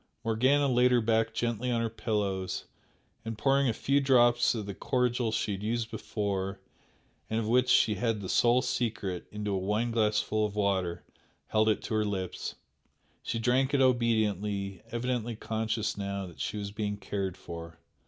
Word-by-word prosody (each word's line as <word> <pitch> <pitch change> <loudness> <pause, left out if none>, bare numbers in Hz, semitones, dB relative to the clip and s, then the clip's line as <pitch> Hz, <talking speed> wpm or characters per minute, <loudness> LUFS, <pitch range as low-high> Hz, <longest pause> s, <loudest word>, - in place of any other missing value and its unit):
Morgana 130 +6 +3
laid 125 -1 +4
her 125 - +5
back 115 0 +2
gently 120 +1 -1
on 120 -1 +1
her 115 - +1
pillows, 100 -4 -2 0.6
and 115 -1 -5
pouring 135 +3 +3
a - - +3
few 140 +5 +1
drops 120 -3 +4
of 110 -3 -3
the 100 - -5
cordial 125 0 0
she 110 -1 -1
had 100 -1 -4
used 115 +1 -2
before, 100 -3 -3 0.7
and 110 - 0
of 110 - -2
which 125 +2 +3
she 110 -3 +5
had 110 +2 -1
the 100 - -6
sole 120 +6 +3
secret, 110 -8 -2
into 105 -1 -3
a 95 - 0
wineglassful 110 +1 +1
of 105 -1 -2
water, 95 -4 0 0.5
held 110 0 +3
it 110 - 0
to - - -4
her 110 0 +2
lips. 95 -3 -3 0.7
She - - -3
drank 130 +4 +2
it - - +3
obediently, 105 -6 +1
evidently 120 -1 -2
conscious 110 -1 -2
now 100 -1 -3
that 90 -2 -12
she - - -3
was 100 -1 -4
being 105 -1 -3
cared 95 -2 -3
for. 85 -2 -9
110 Hz, 170 wpm, -29 LUFS, 100-120 Hz, 0.7 s, her